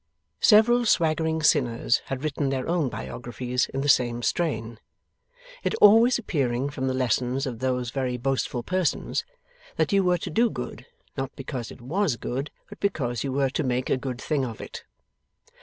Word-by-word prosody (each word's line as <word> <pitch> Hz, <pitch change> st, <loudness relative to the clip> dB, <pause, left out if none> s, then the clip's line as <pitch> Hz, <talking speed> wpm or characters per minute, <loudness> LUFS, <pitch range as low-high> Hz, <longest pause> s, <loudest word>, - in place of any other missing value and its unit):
Several 240 Hz, +3 st, +6 dB
swaggering 160 Hz, -3 st, +2 dB
sinners 120 Hz, -4 st, +2 dB
had 135 Hz, +1 st, -5 dB
written 145 Hz, -2 st, -1 dB
their 130 Hz, -1 st, -2 dB
own 165 Hz, -5 st, +1 dB
biographies 120 Hz, +2 st, -3 dB
in 135 Hz, -, -3 dB
the 145 Hz, -, -2 dB
same 120 Hz, -3 st, +3 dB
strain; 115 Hz, -10 st, -1 dB, 0.8 s
it -, -, 0 dB
always 225 Hz, +4 st, +6 dB
appearing 140 Hz, -, -1 dB
from 130 Hz, -1 st, -3 dB
the 130 Hz, -, 0 dB
lessons 130 Hz, +1 st, 0 dB
of 120 Hz, -4 st, -5 dB
those 125 Hz, -2 st, -1 dB
very 130 Hz, -2 st, -2 dB
boastful 125 Hz, -1 st, -1 dB
persons, 185 Hz, +1 st, -1 dB, 0.5 s
that -, -, 0 dB
you 195 Hz, -1 st, +4 dB
were 180 Hz, -1 st, +3 dB
to 165 Hz, -, -6 dB
do 230 Hz, +8 st, +3 dB
good, -, -, -7 dB, 0.3 s
not 135 Hz, -1 st, -3 dB
because 130 Hz, -3 st, -5 dB
it -, -, -12 dB
WAS 160 Hz, +3 st, 0 dB
good, 130 Hz, +5 st, -4 dB, 0.2 s
but -, -, -12 dB
because 125 Hz, -, -1 dB
you 135 Hz, -, -2 dB
were 135 Hz, 0 st, +1 dB
to 155 Hz, -, -1 dB
make 125 Hz, -1 st, -1 dB
a -, -, +4 dB
good 130 Hz, -1 st, -5 dB
thing 145 Hz, 0 st, -1 dB
of 115 Hz, -4 st, -5 dB
it. -, -, -8 dB
135 Hz, 175 wpm, -25 LUFS, 125-160 Hz, 0.8 s, Several